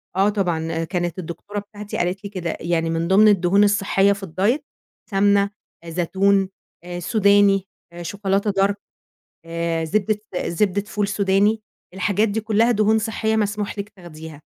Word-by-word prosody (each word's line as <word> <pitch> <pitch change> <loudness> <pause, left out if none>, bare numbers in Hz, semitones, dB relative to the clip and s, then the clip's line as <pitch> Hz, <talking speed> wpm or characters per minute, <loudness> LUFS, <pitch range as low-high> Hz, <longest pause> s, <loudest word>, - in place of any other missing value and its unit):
آه 195 +2 +3
طبعًا، 175 -6 -1
آآ 165 0 -2
كانت 175 +1 -3
الدكتورة 185 +5 -6
بتاعتي 205 0 -8
قالت 180 +3 -1
لي 200 - -5
كده 175 -4 -4
يعني: 165 -1 0
"من 165 +1 -1
ضِمن 200 +3 +6
الدهون 200 0 +4
الصحيّة 200 -1 +3
في 200 0 -7
الdiet 195 - +1 0.5
سَمنة، 200 0 +3 0.4
زيتون، 190 +3 +1 0.3
آآ، 175 0 -6
سوداني، 200 +1 +3 0.3
شوكولاتة 195 +3 -1
dark 200 - +1 0.7
آآ، 165 0 -2
زبدة 210 +4 0 0.3
زبدة 195 +3 0
فول 205 -1 -2
سوداني، 205 +2 +2 0.3
الحاجات 205 +3 +1
دي 210 +2 -1
كلّها 220 +2 +2
دهون 215 0 +3
صحيّة 220 0 -1
مسموح 210 -1 -2
لِك 200 0 -4
تاخديها.". 160 -5 -11
200 Hz, 145 wpm, -22 LUFS, 175-205 Hz, 0.7 s, ضِمن